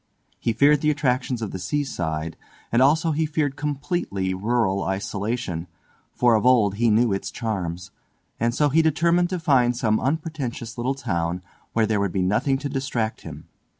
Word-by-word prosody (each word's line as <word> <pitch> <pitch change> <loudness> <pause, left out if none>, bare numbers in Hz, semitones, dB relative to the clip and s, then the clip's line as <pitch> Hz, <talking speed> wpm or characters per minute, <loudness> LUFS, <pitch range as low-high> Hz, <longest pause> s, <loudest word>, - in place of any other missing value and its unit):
He 115 - 0
feared 140 +5 +4
the 150 - +2
attractions 130 -4 0
of 105 - -4
the 95 - -5
seaside, 85 - -2 0.4
and 120 - +3
also 160 +4 +4
he 155 +1 0
feared 150 -3 -1
completely 145 - -2
rural 100 0 0
isolation, 100 -2 -3 0.4
for 120 -1 +3
of 110 - +2
old 120 -6 +4
he 115 +1 +3
knew 110 0 +3
it 95 - -3
charms, 90 -7 -4 0.5
and 120 +1 +1
so 150 0 +3
he 160 +4 +4
determined 170 +3 +2
to 185 - -2
find 125 -7 +2
some 110 -3 +1
unpretentious 135 -6 -3
little 125 +3 -1
town 85 -8 -2 0.3
where 115 -1 +3
there 110 -1 0
would 100 -3 -1
be 95 - +1
nothing 115 +9 +1
to 145 +1 -4
distract 130 -5 -2
him. 75 -2 -10
120 Hz, 170 wpm, -24 LUFS, 100-145 Hz, 0.5 s, feared